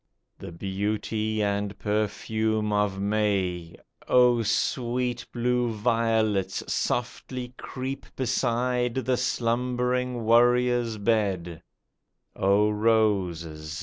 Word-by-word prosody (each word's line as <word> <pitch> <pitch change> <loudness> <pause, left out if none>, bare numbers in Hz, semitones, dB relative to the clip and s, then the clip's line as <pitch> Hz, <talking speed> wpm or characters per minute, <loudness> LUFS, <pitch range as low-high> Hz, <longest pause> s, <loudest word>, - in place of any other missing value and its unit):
The - - -8
beauty 105 +4 -2
and 100 0 -1
perfume 110 +1 -1
of 105 -2 0
May! 100 -5 -1 0.3
O 125 -1 +5
sweet 120 +2 -1
blue 125 0 0
violets! 110 -3 0
softly 125 +1 -3
creep 130 +1 -6
Beside 125 -1 0
the 130 -1 0
slumbering 125 0 -1
warrior's 120 0 +3
bed; 100 -6 0 0.7
O 100 +2 +3
roses 90 -8 0
110 Hz, 80 wpm, -26 LUFS, 100-125 Hz, 0.7 s, O